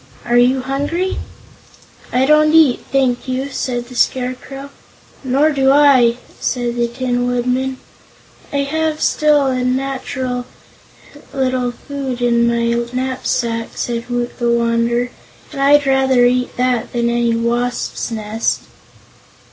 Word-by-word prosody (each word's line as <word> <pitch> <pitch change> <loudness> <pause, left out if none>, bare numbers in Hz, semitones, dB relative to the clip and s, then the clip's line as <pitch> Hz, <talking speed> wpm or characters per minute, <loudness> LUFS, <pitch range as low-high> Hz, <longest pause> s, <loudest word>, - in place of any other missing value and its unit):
Are 240 0 0
you 250 +2 +4
hungry?" 290 +8 -2 0.9
"I 255 +2 +2
don't 305 +1 +4
eat, 310 -6 +5
thank 265 -2 +1
you," 260 +2 -2
said 245 -2 -3
the 250 - -12
Scarecrow. 260 +3 -2 0.5
"Nor 275 +4 +2
do 270 -2 +2
I," 270 -5 +5 0.2
said 240 -2 -1
the 240 0 +1
Tin 245 0 -2
Woodman. 250 +2 -1 0.7
"I 280 -1 0
have 310 +2 -1
still 300 -2 +3
a - - +1
little - - -1
natural 260 -1 -2 0.7
food 260 -1 -3
in 235 -1 +2
my 235 0 +1
knapsack," 250 -2 -2
said 235 0 -3
Woot 245 0 -3
the 240 -1 +1
Wanderer, 235 +1 +1 0.4
"and 275 -2 -5
I'd 285 +1 +5
rather 265 -2 +3
eat 250 0 0
that 250 -2 0
than 235 -1 0
any 235 -1 +1
wasp's 240 +1 -2
nest." 220 0 -2
250 Hz, 125 wpm, -17 LUFS, 240-270 Hz, 0.9 s, eat